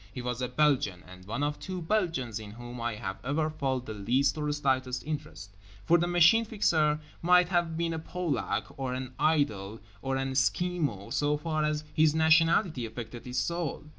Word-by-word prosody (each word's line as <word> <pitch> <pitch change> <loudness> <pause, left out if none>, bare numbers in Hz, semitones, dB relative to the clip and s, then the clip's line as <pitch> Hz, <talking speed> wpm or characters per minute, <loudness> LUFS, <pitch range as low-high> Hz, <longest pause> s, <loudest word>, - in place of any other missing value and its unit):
He 125 - -6
was 125 0 -3
a 125 - 0
Belgian, 125 -9 +1
and 90 0 -13
one 125 +7 -2
of 150 0 -1
two 185 -1 -5
Belgians 165 - -1
in 105 -1 -9
whom 120 +1 -8
I 120 -1 -2
have 95 -2 -5
ever 155 +4 0
felt 135 -4 -2
the 110 - -5
least 125 +7 +1
or 150 -1 -1
slightest 130 -3 0
interest; 100 - -6 0.3
for 170 +1 +5
the 175 - +1
Machine 175 +6 +5
Fixer 160 -9 +2 0.2
might 180 0 +5
have 170 -3 0
been 170 0 0
a 160 - -3
Polak 170 -2 -2
or 130 -2 -2
an 130 0 -5
Idol 115 -10 +1 0.2
or 135 0 -1
an 135 0 -1
Esquimo 135 - 0
so 150 0 +1
far 155 0 -1
as 150 0 0
his 155 0 +4
nationality 160 - +4
affected 115 +1 -8
his 125 0 -4
soul. 170 +4 -2
145 Hz, 185 wpm, -29 LUFS, 125-160 Hz, 0.3 s, for